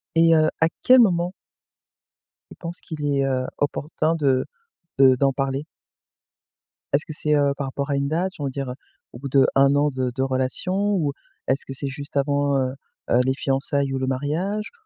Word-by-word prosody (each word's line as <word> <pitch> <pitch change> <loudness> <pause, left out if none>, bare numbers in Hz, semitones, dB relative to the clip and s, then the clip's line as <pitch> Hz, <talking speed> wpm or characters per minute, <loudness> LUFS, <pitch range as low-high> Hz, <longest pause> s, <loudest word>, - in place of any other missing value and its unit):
Et 165 0 +5
heu, 155 0 +4
à 160 - +4
quel 255 0 +7
moment 180 -5 +3 1.2
tu - - -11
penses 170 0 -5
qu'il 155 -3 -6
est, 140 -1 +1
heu, 130 -1 0
opportun 155 +2 -1
de 135 -5 +1 0.5
de 130 -1 +7
d'en 135 +2 +2
parler? 135 +1 -2 1.3
Est-ce 145 +2 +2
que 155 - -7
c'est, 150 0 +1
heu, 140 -1 +2
par 140 -2 -3
rapport 140 +2 -4
à 140 - +1
une 140 0 0
date, 180 +4 -1
on - - -4
va 135 - -1
dire, 135 0 -4
heu, - - -7 0.4
au 120 - -10
bout 140 +1 -6
d'1 135 0 +5 0.5
de 130 -1 -1
de 130 - -3
relation 130 +7 0 0.2
ou 150 -6 0 0.3
est-ce 135 +2 0
que 135 - -6
c'est 140 +1 -3
juste 140 +1 -6
avant, 140 0 +1
heu 130 -1 0 0.4
heu, 120 - +4
les 130 - +2
fiançailles 135 0 0
ou - - -1
le 130 - -2
mariage 160 +11 -2
140 Hz, 190 wpm, -23 LUFS, 135-155 Hz, 1.3 s, quel